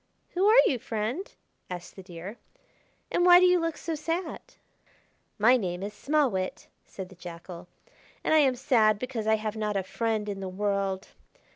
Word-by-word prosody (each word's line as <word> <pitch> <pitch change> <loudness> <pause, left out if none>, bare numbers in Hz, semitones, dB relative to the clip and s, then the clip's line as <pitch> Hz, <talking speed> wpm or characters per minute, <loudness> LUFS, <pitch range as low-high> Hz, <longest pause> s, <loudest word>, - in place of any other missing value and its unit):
"Who 375 +3 +2
are 440 +3 +6
you, 255 - +1
Friend?" 225 - -3 0.4
asked 180 -1 -7
the 190 - -9
Deer, 185 +4 -9 0.7
"and 350 - +2
why 355 0 +9
do 365 - +5
you 360 0 +5
look 330 -1 -2
so 330 - -4
sad?" 330 +3 -3 1.0
"My 240 +5 +5
name 180 -4 -3
is 205 +1 -5
Small 290 +3 +1
Wit," 185 -1 -3 0.2
said 190 -2 -9
the 190 - -14
Jackal; 175 0 -10 0.6
"and - - +1
I 315 - +6
am 270 -4 +4
sad 225 -5 +3
because 235 -2 -4
I 220 - +5
have 215 0 -4
not 210 -2 -1
a 195 - -1
friend 220 +2 -2
in 200 -1 -4
the 190 -1 -4
world. 195 0 -2
215 Hz, 180 wpm, -28 LUFS, 190-290 Hz, 1.0 s, why